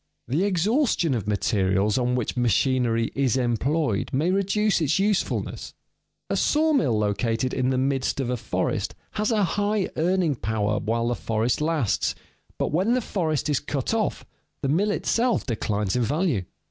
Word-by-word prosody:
_ - - -4
The 175 +7 +2
exhaustion 205 - +1
of 110 -5 -3
materials 100 +1 +1
on 125 0 +1
which 125 -3 -2
machinery 120 -1 +1
is 135 -3 +1
employed 125 0 0
may 155 +7 +1
reduce 200 +1 +1
its 155 -1 +2
usefulness. 200 0 -1 0.5
A - - -1
sawmill 295 - +2
located 115 +4 0
in 130 -1 0
the 130 - +1
midst 135 +1 0
of 125 -2 -1
a - - +1
forest 120 - -2 0.2
has 210 0 -1
a 215 -3 +2
high 205 +2 0
earning 175 -1 +2
power 105 -3 -1
while 115 +2 -1
the - - +1
forest 115 +2 -1
lasts, 150 -9 0 0.4
but - - -1
when 190 +10 +2
the - - +2
forest 160 - -1
is 145 -3 +1
cut 140 - -3
off 220 -2 -1 0.4
the 135 - 0
mill 190 +9 +2
itself 235 +3 +1
declines 105 -4 -1
in 125 - +1
value. 140 - 0
135 Hz, 160 wpm, -25 LUFS, 115-190 Hz, 0.5 s, The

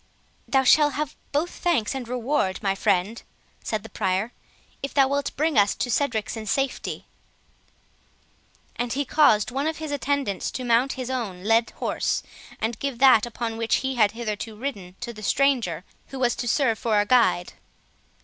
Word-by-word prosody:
"Thou 270 -1 +3
shalt 295 +2 +5
have 300 0 -3 0.2
both 310 +5 0
thanks 300 -12 0
and 260 -3 -5
reward, 245 -5 -1
my 195 -1 +2
friend," 200 +2 0 0.4
said 215 -2 -2
the 225 - -10
Prior, 190 +5 -1 0.5
"if 275 - -5
thou 275 -2 +5
wilt 280 +1 -1
bring 305 -4 +2
us 200 0 +3
to 245 - -2
Cedric's 240 -6 0
in 220 -1 -7
safety." 270 +4 -2 1.7
And 245 -1 -2
he 285 +2 -1
caused 245 -7 +4
one 275 +4 -1
of 320 - -2
his 310 -2 -5
attendants 280 -7 -1
to 255 - -4
mount 245 +2 +2
his 255 0 -5
own 205 -8 -4
led 225 +2 +3
horse, - - -1 0.4
and 225 +1 -2
give 275 -3 -3
that 245 -3 +6
upon 230 -1 -4
which 230 0 +1
he 265 - 0
had 215 -4 +3
hitherto 220 -1 -4
ridden 210 -7 -6
to 240 -1 -5
the 215 - -11
stranger, 225 - +1 0.2
who 270 - -8
was 245 -2 +1
to 240 - -3
serve 235 -3 +2
for 220 -3 +2
a 205 - +2
guide. 225 -7 +3
240 Hz, 175 wpm, -24 LUFS, 215-275 Hz, 1.7 s, that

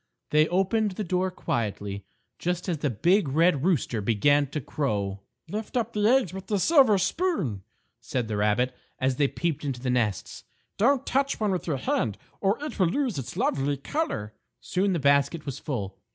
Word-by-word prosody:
They 155 +1 +5
opened 195 +3 +1
the 210 - -3
door 185 +1 0
quietly, 100 - -3 0.3
just 180 +1 -2
as 170 -5 -1
the 145 - 0
big 175 - +2
Red 155 +1 +3
Rooster 150 - +1
began 140 +8 +3
to 145 +3 -4
crow. 105 -9 -2 0.3
"Lift 215 +7 -4
up 235 -1 -1
the 210 - 0
eggs 245 -7 +3
with 190 0 -7
the 210 - +1
silver 260 - +5
spoon," 195 - 0 0.4
said 125 -3 -3
the 110 - -2
rabbit, 105 +5 +1 0.2
as 130 -1 0
they 145 - +3
peeped 160 0 -2
into 135 -4 -3
the 125 0 -1
nests; 110 -6 -1 0.3
"don't 265 +4 +3
touch 275 +1 0
one 210 -2 +1
with 180 -2 -2
your 150 -4 0
hand 110 -4 -1 0.2
or 200 +3 +2
it 300 - -6
will 185 - +4
lose 245 - -1
its 130 - -7
lovely 140 +1 0
color." 140 - -3 0.3
Soon 190 +1 0
the 170 - 0
basket 140 +3 +2
was 140 -2 -5
full. 100 -10 -4
155 Hz, 180 wpm, -26 LUFS, 125-195 Hz, 0.4 s, They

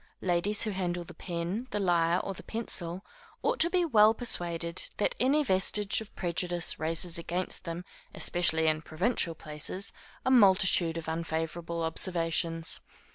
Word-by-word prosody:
Ladies 190 +4 +1
who 215 - -2
handle 180 -2 -3
the - - -12
pen, 180 +7 -4
the 210 - -2
lyre, 175 -2 +2
or 195 - -4
the - - -10
pencil, 190 -5 -3 0.4
ought - - 0
to 335 - +4
be 360 -1 +1
well 220 -6 +5
persuaded 170 -7 -1 0.2
that 210 - +1
any 275 +6 +3
vestige 200 -1 +2
of 215 - -12
prejudice 175 -1 -1
raises 165 +2 -1
against 175 +2 -4
them, 170 +1 -5 0.3
especially 160 -2 +3
in 155 -1 +1
provincial 165 +2 0
places, 155 +5 -1 0.3
a 260 - +2
multitude 190 -7 +5
of 165 - -6
unfavorable 165 +1 -3
observations. 165 0 +1
175 Hz, 145 wpm, -29 LUFS, 165-200 Hz, 0.4 s, well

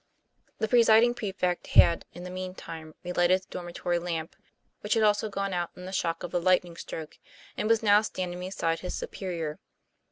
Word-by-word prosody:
The 220 - 0
presiding 230 0 +6
prefect 190 -6 -2
had, 170 - +5
in 175 - -10
the 180 - -7
mean 185 0 -5
time, 160 -3 -9
re 180 - -4
lighted 180 +2 +3
the - - -22
dormitory 175 0 -2
lamp 170 -1 -4 0.4
(which 210 - 0
had 225 - +3
also 210 +1 +3
gone 195 -1 -2
out 175 -1 -1
in 180 - -10
the 185 - -6
shock 170 -3 -1
of 175 - -5
the 175 - 0
lightning 180 -1 +2
stroke), 160 -1 -8 0.4
and 215 - -1
was 225 -1 +3
now 205 0 +6
standing 180 -4 -4
beside 180 -3 -1
his 180 - -4
superior. 170 -4 -4
180 Hz, 190 wpm, -28 LUFS, 175-205 Hz, 0.4 s, presiding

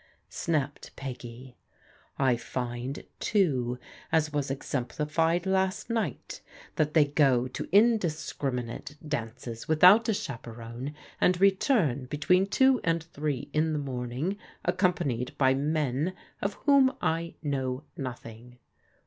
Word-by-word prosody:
" - - -45 0.2
snapped 150 -5 -2
Peggy. 125 -1 -8 0.3
" - - -28 0.2
I 130 -3 +3
find, 120 +2 -4 0.2
too, 130 - +1 0.3
as 155 -2 +2
was 145 -2 -1
exemplified 150 +6 -1
last 190 +3 0
night, 215 - -3 0.4
that 150 0 +1
they 155 -2 +7
go 135 -4 +3
to - - -6
indiscriminate 155 - +1
dances 115 -4 -5
without 185 +9 +6
a - - +3
chaperon, 120 - -6 0.2
and 180 0 +3
return 190 - +3
between 180 +8 +2
two 265 +4 +4
and 165 -1 +1
three 145 -3 -4
in 155 +1 +2
the - - 0
morning, 135 +6 -3 0.3
accompanied 175 - 0
by 130 -1 +4
men 150 +3 0 0.3
of 200 +1 -1
whom 275 -2 +4
I 165 +1 -1
know 135 -2 -2
nothing." 125 -2 -8
145 Hz, 120 wpm, -28 LUFS, 125-175 Hz, 0.4 s, they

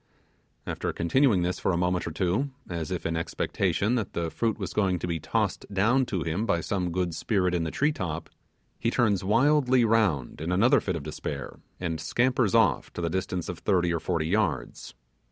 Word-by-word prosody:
After - - -3
continuing 105 +1 +3
this 90 +1 -1
for - - +1
a 85 - 0
moment 90 0 0
or - - -3
two, 95 - 0 0.2
as 85 -2 -4
if 90 -1 -4
in 85 - -1
expectation 95 +5 0
that 115 -6 -1
the 85 -1 -2
fruit 115 -2 -1
was 95 -4 -5
going 95 -4 +1
to - - -4
be 85 -2 -2
tossed - - -1
down 120 +7 +2
to 90 -5 -2
him 90 +8 -2
by 85 - +2
some 90 +1 -2
good 90 -1 -1
spirit 90 0 0
in 85 -2 0
the - - -1
tree 145 - +1
top, 80 - -4 0.5
he 115 - +1
turns 110 -6 +2
wildly 130 +3 +4
round 100 - +1
in 80 +2 -2
another 120 +10 +4
fit 90 - -2
of 80 - -5
despair, 75 +1 -6 0.2
and 80 -3 -3
scampers 120 +5 +1
off 100 - +3
to - - -5
the 85 -1 -1
distance 95 -1 -2
of 90 - -5
thirty 90 -4 +1
or 85 - 0
forty 80 -1 -1
yards. 90 -6 -1
90 Hz, 200 wpm, -27 LUFS, 85-110 Hz, 0.5 s, wildly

